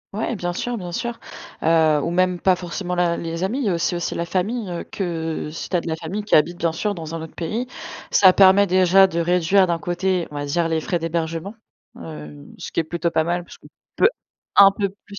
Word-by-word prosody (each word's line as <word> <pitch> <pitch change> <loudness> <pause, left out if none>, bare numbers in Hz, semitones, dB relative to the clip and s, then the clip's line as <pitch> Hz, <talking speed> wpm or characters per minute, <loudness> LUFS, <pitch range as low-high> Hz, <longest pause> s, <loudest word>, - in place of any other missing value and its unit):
Ouais 225 +3 -2
bien 175 -3 -3
sûr, 245 +7 -3
bien 180 -4 -6
sûr. 235 +6 -4 0.4
Heu, 160 -2 +3
ou - - -1
même 180 0 +1
pas 185 -2 +3
forcément 180 +1 -4
la 175 -1 +1
les 165 +2 -3
amis, 235 +8 -2
il - - -1
y - - +2
a - - +1
aussi 170 +1 -1 0.2
la 170 - -3
famille, 200 +5 -2
heu, 175 -1 -4
que, 165 -5 -4
heu, - - -8
si 160 - -7
tu - - -1
as - - +1
de 170 - -8
la 160 - -1
famille 170 +6 -5
qui - - +3
habite 170 +3 +3
bien 165 -2 0
sûr 205 +5 -2
dans 165 -3 -7
un 165 - -5
autre 160 - -9
pays, 215 +9 -3 0.5
ça 190 -2 +6
permet 195 +1 +6
déjà 185 +1 +5
de 170 -2 -2
réduire 180 +2 +3
d'un 170 -1 -1
côté, 180 -1 -1
on 150 - -11
va 145 0 -3
dire, 165 +4 0
les 160 -1 -1
frais 175 0 -2
d'hébergement. 165 +4 -3 0.4
Heu, 75 -3 -10
ce - - -8
qui - - +2
est - - -6
plutôt 170 +1 -2
pas 160 -1 +1
mal 175 +1 -2
parce - - -14
qu'on - - -17 0.3
peut - - +5 0.5
un 195 -1 +9
peu 200 -2 0 0.2
plus 200 - -11
175 Hz, 245 wpm, -21 LUFS, 165-190 Hz, 0.5 s, un